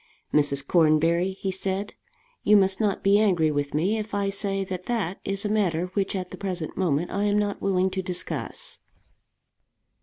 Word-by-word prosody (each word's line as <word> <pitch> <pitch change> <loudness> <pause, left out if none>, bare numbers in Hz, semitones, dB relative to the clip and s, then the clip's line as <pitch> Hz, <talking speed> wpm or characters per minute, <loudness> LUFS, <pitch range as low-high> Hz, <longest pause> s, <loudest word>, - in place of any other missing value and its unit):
"Mrs. 140 -2 +2
Cornbury," 170 +2 +3
he 190 0 -3
said, 190 +2 -3 0.5
"you 210 0 +5
must 190 -1 +3
not 205 -4 0
be 200 +1 +5
angry 175 -7 +3
with 145 0 -2
me 190 +8 +1
if 215 -1 -5
I 200 -1 0
say 195 0 -1
that 185 -1 -6
that 205 -7 -2
is 195 +1 -2
a - - +2
matter 180 -5 0
which 200 -1 -1
at 185 -1 -4
the - - -7
present 180 -5 -4
moment 170 -2 0
I 200 +1 0
am 205 0 +2
not 205 -1 -1
willing 190 -1 +1
to 190 0 -2
discuss." 180 0 -5
190 Hz, 180 wpm, -25 LUFS, 175-200 Hz, 0.5 s, you